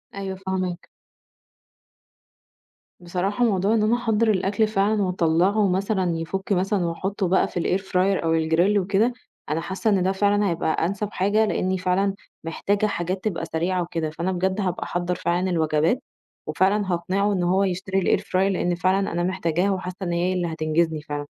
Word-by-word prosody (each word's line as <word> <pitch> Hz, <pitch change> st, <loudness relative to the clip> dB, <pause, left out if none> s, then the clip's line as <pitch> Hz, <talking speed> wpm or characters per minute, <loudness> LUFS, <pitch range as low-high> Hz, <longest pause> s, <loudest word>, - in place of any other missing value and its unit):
أيوه 195 Hz, -1 st, -4 dB
فاهماك. 185 Hz, -2 st, -4 dB, 2.1 s
بصراحة 185 Hz, +6 st, -1 dB
موضوع 200 Hz, -1 st, +2 dB
إن 220 Hz, -2 st, +2 dB
أنا 220 Hz, +3 st, +3 dB
أحضّر 230 Hz, -2 st, +1 dB
الأكْل 200 Hz, +2 st, +1 dB
فعلًا 210 Hz, 0 st, +1 dB
وأطلّعه 185 Hz, +3 st, +2 dB
مثلًا 190 Hz, -2 st, 0 dB
يفُك 190 Hz, +5 st, -4 dB
مثلًا 190 Hz, 0 st, +1 dB
وأحطّه 190 Hz, +4 st, -2 dB
بقى 185 Hz, +2 st, +3 dB
في -, -, -4 dB
الair 185 Hz, +3 st, 0 dB
fryer 190 Hz, 0 st, +1 dB
أو 165 Hz, 0 st, +2 dB
الgrill 180 Hz, +6 st, +3 dB
وكده، 200 Hz, +6 st, +1 dB, 0.4 s
أنا 155 Hz, +2 st, -1 dB
حاسّة 190 Hz, +6 st, -2 dB
إن 195 Hz, -3 st, +2 dB
ده 190 Hz, -, +2 dB
فعلًا 205 Hz, +1 st, +2 dB
هيبقى 165 Hz, -1 st, -1 dB, 0.2 s
أنسب 200 Hz, +3 st, -2 dB
حاجة 210 Hz, +3 st, +2 dB
لأنيّ 190 Hz, -2 st, 0 dB
فعلًا 185 Hz, +2 st, 0 dB, 0.3 s
محتاجة 200 Hz, +5 st, 0 dB
حاجات 185 Hz, -1 st, -2 dB
تبقى 170 Hz, -6 st, -2 dB
سريعة 175 Hz, +3 st, -1 dB
وكده، 165 Hz, -2 st, -3 dB
فأنا 170 Hz, +4 st, -3 dB
بجد 190 Hz, +2 st, -1 dB
هابقى 185 Hz, -2 st, -2 dB
أحضّر 175 Hz, +1 st, -2 dB
فعلًا 175 Hz, +2 st, 0 dB
الوجبات، 160 Hz, -, +1 dB, 0.5 s
وفعلًا 195 Hz, 0 st, +1 dB
هاقنعه 190 Hz, +4 st, 0 dB
إن 185 Hz, -2 st, 0 dB
هو 185 Hz, +3 st, +2 dB
يشتري 190 Hz, 0 st, +1 dB
الair -, -, -6 dB
fryer -, -, -8 dB
لإن 185 Hz, -2 st, +1 dB
فعلًا 190 Hz, +2 st, +1 dB
أنا 175 Hz, +1 st, -1 dB
محتاجاها 180 Hz, +1 st, 0 dB
وحاسّة 185 Hz, -1 st, -4 dB
إن 175 Hz, -, -2 dB
هي 175 Hz, +2 st, 0 dB
اللي 180 Hz, -2 st, -1 dB
هتنجزني 160 Hz, 0 st, 0 dB
فعلًا، 145 Hz, -1 st, -5 dB
185 Hz, 165 wpm, -23 LUFS, 175-200 Hz, 2.1 s, أنا